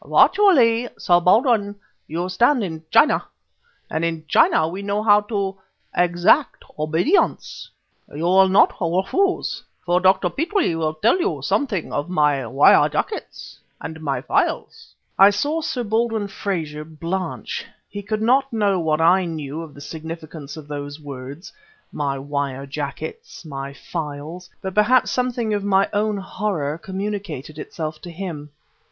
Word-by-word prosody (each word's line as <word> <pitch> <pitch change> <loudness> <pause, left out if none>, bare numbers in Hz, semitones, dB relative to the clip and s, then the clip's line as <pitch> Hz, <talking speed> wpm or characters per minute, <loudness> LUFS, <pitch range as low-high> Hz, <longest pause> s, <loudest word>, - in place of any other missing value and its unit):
Virtually, 245 - +4
Sir 175 -1 +3
Baldwin, 205 +2 +3 0.3
you 170 +3 -3
stand 240 +7 +2
in 160 -4 -5
China; 230 +8 +4 0.6
and 160 - -2
in 165 -1 -2
China 155 +2 +4
we 185 +4 -5
know 200 +1 -2
how 210 -1 +5
to 200 -2 -3 0.4
exact 175 - +2 0.2
obedience. 160 - 0 0.4
You 150 +3 -5
will 190 +2 +5
not 190 - +5
refuse, 190 - 0 0.2
for 175 0 +2
Dr. 185 -1 +3
Petrie 340 - 0
will 160 -1 -1
tell 230 - +2
you 375 +4 -1
something 225 - -1
of 145 +4 -2
my 150 -7 +1
wire 135 +5 +5
jackets - - -5 0.2
and 160 0 -7
my 140 -3 -2
files...." - - -2 0.2
I 195 +1 +9
saw 290 +11 -1
Sir 250 -5 -2
Baldwin 220 -1 0
Frazer 160 -7 -4
blanch. 165 +4 -4 0.2
He 205 - -7
could 215 +1 -3
not 265 +4 +3
know 205 -4 +1
what 160 -1 0
I 180 +3 +4
knew 155 -2 -5
of 160 -3 -10
the 140 - -12
significance 160 -1 -8
of 150 -2 -10
those 145 0 -6
words 140 +3 -9 0.4
"my 140 -2 -2
wire 140 -1 -3
jackets, 145 +4 -7
my 140 -2 -6
files" 160 +4 -7
but 190 -1 -4
perhaps 235 +5 +3
something 245 -3 -1
of 205 -1 -1
my 195 -1 +3
own 210 0 0
horror 185 -6 -3
communicated 190 -7 -5
itself 155 -1 -6
to 175 - -9
him. 165 -4 -6
180 Hz, 145 wpm, -21 LUFS, 155-210 Hz, 0.6 s, I